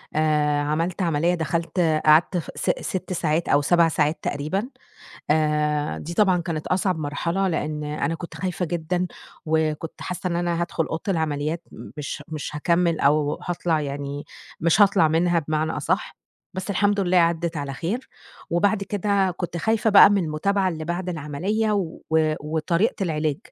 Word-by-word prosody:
آآ 150 -1 +2
عملت 165 +5 -1
عملية 170 0 +1
دخلت 165 +2 -2 0.3
قعدت 155 +4 +5
ف 165 - -4
س - - -2
ست 185 0 -3
ساعات 165 -1 0
أو 145 - +4
7 170 +3 +4
ساعات 150 0 0
تقريبًا، 155 - -2 0.6
آآ 150 -1 +1
دي 170 +3 -6
طبعًا 190 -2 +4
كانت 165 -3 -4
أصعب 185 -1 0
مرحلة، 170 +6 -1
لإن 150 -3 -2
أنا 150 +1 -2
كنت 165 0 -8
خايفة 180 +2 -2
جدًا، 175 +2 -1 0.4
وكنت 160 0 -1
حاسِّة 180 0 -3
إن 170 - -1
أنا 175 -1 -1
هادخُل 170 -2 -1
أوضة 160 - -4
العمليات 160 -2 -1 0.3
مش 150 0 -5
مش 150 -1 -5
هاكمِل 170 +1 +1
أو 145 +1 +2
هاطلع 170 -2 0
يعني 140 0 -4 0.4
مش 170 +4 +3
هاطلع 195 -5 +5
منها 170 +2 +2
بمعنى 155 0 -1
أصحّ، - - -2 0.4
بس 190 +2 -4
الحمد 205 +1 +2
لله 185 -1 +1
عَدّت 170 -1 +2
على 140 -1 -3
خير، 190 - -4 0.4
وبعد 195 +4 +2
كده 200 -1 +1
كنت 175 -2 -4
خايفة 220 +5 +1
بقى 200 0 +9
من 200 -3 +2
المُتابعة 190 +5 0
اللي 160 -3 -4
بعد 175 +2 -3
العملية، 180 +8 -1
و 190 -6 -2 0.4
وطريقة 160 - 0
العلاج، 155 -4 -1
165 Hz, 155 wpm, -24 LUFS, 155-180 Hz, 0.6 s, بقى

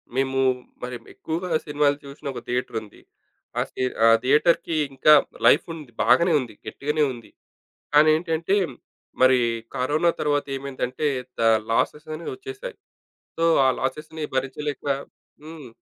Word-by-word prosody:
మేము 135 0 0 0.4
మరేమో 125 -2 -7
ఎక్కువగా 170 +3 -4 0.2
సినిమాలు 145 -1 +1
చూసిన 140 +1 -12
ఒక - - -5
థియేటరుంది. 115 -4 -4 0.6
అసలీ - - -4 0.2
ఆ - - +7 0.2
థియేటర్‌కి 150 +5 +3 0.2
ఇంకా 150 +3 +6 0.3
లైఫ్ 145 - +5
ఉంది. 150 -6 -11
బాగనే 145 +9 +4
ఉంది. 120 -4 -8
గట్టిగానే 150 +2 -1
ఉంది. 120 -2 -13 0.6
కానీ 150 +1 +7
ఏంటంటే, 165 +3 0 0.7
మరి 130 0 +6 0.4
కరోనా 150 +7 +2
తర్వాత 145 -1 0
ఏమైందంటే 135 +1 -3 0.3
దా 115 - +4 0.2
లాసెస్ 150 +7 0
అనేవి 160 +2 -6
ఒచ్చేశాయి. 410 +5 -8 0.6
సో, 165 - 0 0.2
ఆ - - +4
లాసెస్‌ని 155 +3 -4
భరించలేక 140 +2 -3 0.6
హ్మ్. 155 -4 -10
145 Hz, 120 wpm, -24 LUFS, 130-160 Hz, 0.7 s, ఆ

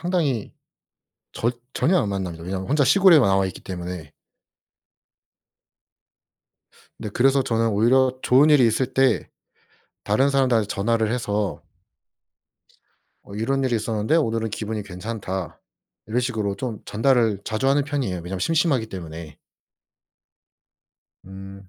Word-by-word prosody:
상당히 160 - -1 0.8
절 120 +2 -1 0.2
전혀 180 +2 +2
안 - - -2
만납니다. 90 -4 -4
왜냐하면 95 +1 -4
혼자 145 0 +3
시골에 190 0 +6
나와 95 -6 +3
있기 95 - -8
때문에. 90 -4 -7 2.8
네. 110 - -6
그래서 135 +2 +3
저는 115 -2 0
오히려 125 +5 +2
좋은 135 +5 +5
일이 140 -5 +6
있을 125 +4 0
때 130 -3 +2 0.8
다른 130 +7 +2
사람들한테 125 -6 +2
전화를 110 +2 0
해서 105 -4 -2 1.6
어 100 - -12
"이런 135 +6 -1
일이 125 -2 0
있었는데 110 +5 0
오늘은 115 -7 0
기분이 110 0 -4
괜찮다." 95 -2 -6 0.5
이런 115 +3 0
식으로 110 -5 -2
좀 125 -5 -5
전달을 115 -3 +1
자주 115 +4 -1
하는 140 +1 +2
편이에요. 140 -10 -2
왜냐하면 90 +2 -5
심심하기 150 - +1
때문에. 85 -5 -9 1.9
음. 95 0 -11
115 Hz, 280 characters per minute, -23 LUFS, 100-130 Hz, 2.8 s, 시골에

